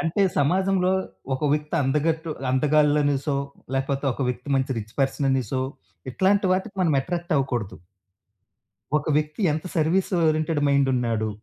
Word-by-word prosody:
అంటే, 170 +4 +1 0.2
సమాజంలో 185 +5 +2 0.4
ఒక 130 - -5
వ్యక్తి 150 0 -1
అందగట్టు 160 +4 0 0.2
అందగాళ్ళనేసో, 145 0 +2 0.4
లేపోతే 135 +1 -1
ఒక 135 - -4
వ్యక్తి 125 +2 -4
మంచి 130 -1 -1
రిచ్ 110 +1 -8
పర్సననేసో, 135 -2 0 0.5
ఇట్లాంటి 195 +5 +2
వాటికి 190 +2 -2
మనం 165 -4 +2
ఎట్రాక్ట్ 175 +4 -3
అవ్వకూడదు. 125 -7 -2 1.2
ఒక 150 - -2
వ్యక్తి 155 +6 -2
ఎంత 155 +3 -4
సర్వీస్ 165 +4 +1 0.2
ఓరియెంటెడ్ 155 0 +1
మైండున్నాడు, 125 -6 +1
150 Hz, 120 wpm, -24 LUFS, 135-165 Hz, 1.2 s, సమాజంలో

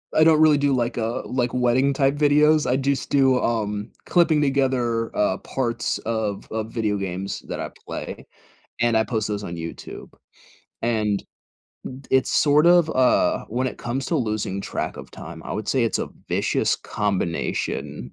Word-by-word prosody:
I 155 - +6
don't 155 -1 +5
really 155 -2 +6
do, 145 0 +2
like 120 -1 0
a 115 +1 -1
like, 125 -2 -1
wedding 125 +3 +2
type 135 0 +2
videos, 150 +1 +4
I 125 - +2
just 140 -1 -1
do, 135 -2 +4
um, 105 -2 -2
clipping 165 -4 +3
together, 130 -5 0
uh, 100 -2 +1
parts 120 -4 -2
of 110 -3 -3
of 110 0 -3
video 110 -3 0
games 95 0 -4
that - - -4
I - - -4 0.2
play, - - -6 0.6
and 120 -1 +3
I 110 - +3
post 110 -4 -2
those 105 -1 -3
on 85 - -5
YouTube, 85 0 -8 0.7
and, 110 -3 +1 0.7
d 130 +1 -9
it's 130 -1 +3
sort 150 +2 +4
of, 175 -2 +6
uh 130 -4 +2
when 125 +3 -1
it - - -4
comes 130 +3 -3
to 165 - 0
losing 105 -5 -2
track - - -4
of - - -10
time, 80 0 -10
I - - -5
would 105 - -4
say 130 -3 +2
it's 115 - 0
a - - -3 0.2
vicious - - +1
combination, 100 -5 -3
120 Hz, 170 wpm, -23 LUFS, 110-140 Hz, 0.7 s, I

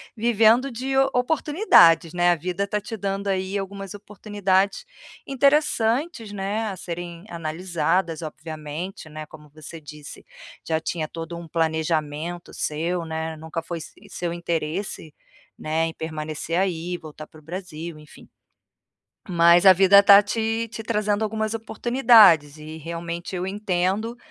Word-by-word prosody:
vivendo 230 +3 +3
de 260 +3 -3
o 270 0 +4
oportunidades, 250 - +4
né, 175 0 +3
a - - +3
vida 180 +5 -3
tá 210 +1 -2
te 215 +2 -7
dando, 200 0 -3
aí, 190 +1 -1
algumas 195 0 -6
oportunidades 205 - -1 0.4
interessantes, 275 -3 +1
né, 205 +3 -2
a 190 - -6
serem 175 +1 -7
analisadas, 170 +1 -2
obviamente, 155 +2 -7
né, 155 0 -8
como 150 -1 -15
você 155 +2 -11
disse, 150 0 -11 0.4
já 160 -1 0
tinha 160 -1 -3
todo 165 +2 -7
um 170 -2 -10
planejamento 160 +1 -2
seu, 170 +3 -2
né, 160 0 -4
nunca 160 +1 -6
foi 170 -1 -6
se - - -10 0.2
seu 175 -2 -4
interesse, 170 -1 -4 0.5
né, 160 +1 0
em 165 - -6
permanecer 155 +1 -4
aí, 180 -2 -1
voltar 155 -2 -11
para 155 - -17
o - - -27
Brasil, 170 -2 -7
enfim. 150 - -16 1.0
Mas 170 +1 +5
a 190 - +11
vida 195 +2 +7
tá 200 0 +9
te 225 +2 -2
te 225 0 -8
trazendo 210 -1 0
algumas 220 0 -2
oportunidades, 220 - +4
e 155 +1 -9
realmente 170 +3 -6
eu 180 - -2
entendo, 200 +3 -1
175 Hz, 140 wpm, -23 LUFS, 160-205 Hz, 1.0 s, a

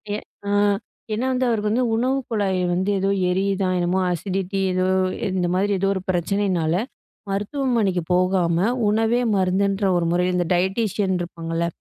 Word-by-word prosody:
ஏ - - -1 0.3
ஆ - - 0 0.6
ஏனா 225 +4 -1
வந்து 255 0 +1
அவருக்கு 215 -3 0
வந்து 245 +3 +2
உணவு 255 +4 +1
குழாய் 200 -4 0
வந்து 185 +3 0
ஏதோ 195 +1 0 0.2
எரியுதா 195 +1 0
என்னமோ 175 +1 +1
அசிடிட்டி 190 +3 -2
ஏதோ 185 0 +1 0.5
இந்த 180 -1 +1
மாதிரி 200 +2 +1
ஏதோ 195 - +1
ஒரு 190 - -3
பிரச்சனைனால, 180 -2 0 0.6
மருத்துவமனைக்கு 205 -3 0
போகாம 180 0 +2 0.2
உணவே 225 +3 +2 0.2
மருந்துன்ற 195 +2 +1
ஒரு 170 -1 +1
முறையில 180 +1 +1
இந்த 175 -1 0
டயட்டீஷியன் 190 +1 0
இருப்பாங்கல்ல 165 -1 -3
190 Hz, 140 wpm, -22 LUFS, 180-210 Hz, 0.6 s, வந்து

